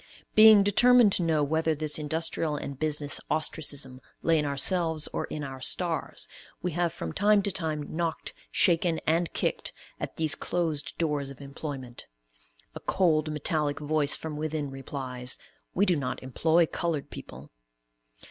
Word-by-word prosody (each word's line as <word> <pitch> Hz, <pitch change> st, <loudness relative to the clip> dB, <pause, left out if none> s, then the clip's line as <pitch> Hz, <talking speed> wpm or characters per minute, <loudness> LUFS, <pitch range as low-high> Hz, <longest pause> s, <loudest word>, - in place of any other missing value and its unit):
Being 215 Hz, -2 st, +8 dB
determined 240 Hz, +2 st, +6 dB
to 190 Hz, -, +5 dB
know 160 Hz, -3 st, +2 dB
whether 160 Hz, +2 st, +1 dB
this 150 Hz, 0 st, 0 dB
industrial 160 Hz, 0 st, -1 dB
and 140 Hz, -2 st, -6 dB
business 150 Hz, -2 st, -1 dB
ostracism 145 Hz, -4 st, 0 dB, 0.2 s
lay 165 Hz, -1 st, +3 dB
in 150 Hz, -, 0 dB
ourselves 160 Hz, +2 st, +1 dB
or -, -, -2 dB
"in 150 Hz, -, -6 dB
our 135 Hz, -1 st, -7 dB
stars," 160 Hz, -, 0 dB, 0.3 s
we 180 Hz, -, -2 dB
have 175 Hz, +1 st, 0 dB
from 170 Hz, -, -6 dB
time 205 Hz, 0 st, +3 dB
to 200 Hz, -, 0 dB
time, 160 Hz, -5 st, -2 dB
knocked, 165 Hz, -1 st, -2 dB, 0.2 s
shaken, 170 Hz, -1 st, +3 dB
and 165 Hz, +1 st, +1 dB
kicked, -, -, -1 dB, 0.3 s
at -, -, -5 dB
these 160 Hz, -2 st, +1 dB
closed 160 Hz, -4 st, -2 dB
doors 150 Hz, -4 st, -1 dB
of 140 Hz, -, -11 dB
employment. 140 Hz, -3 st, -7 dB, 0.7 s
A -, -, -7 dB
cold, 155 Hz, -5 st, +1 dB
metallic 150 Hz, 0 st, -1 dB
voice 150 Hz, -1 st, +1 dB
from 155 Hz, -2 st, -6 dB
within 155 Hz, -2 st, -3 dB
replies, 130 Hz, -2 st, -5 dB, 0.4 s
"We 200 Hz, -, +3 dB
do 180 Hz, -3 st, +3 dB
not 135 Hz, -4 st, -3 dB
employ 160 Hz, +6 st, +2 dB
colored 160 Hz, -3 st, -3 dB
people." 65 Hz, +4 st, -10 dB
155 Hz, 150 wpm, -28 LUFS, 145-170 Hz, 0.7 s, Being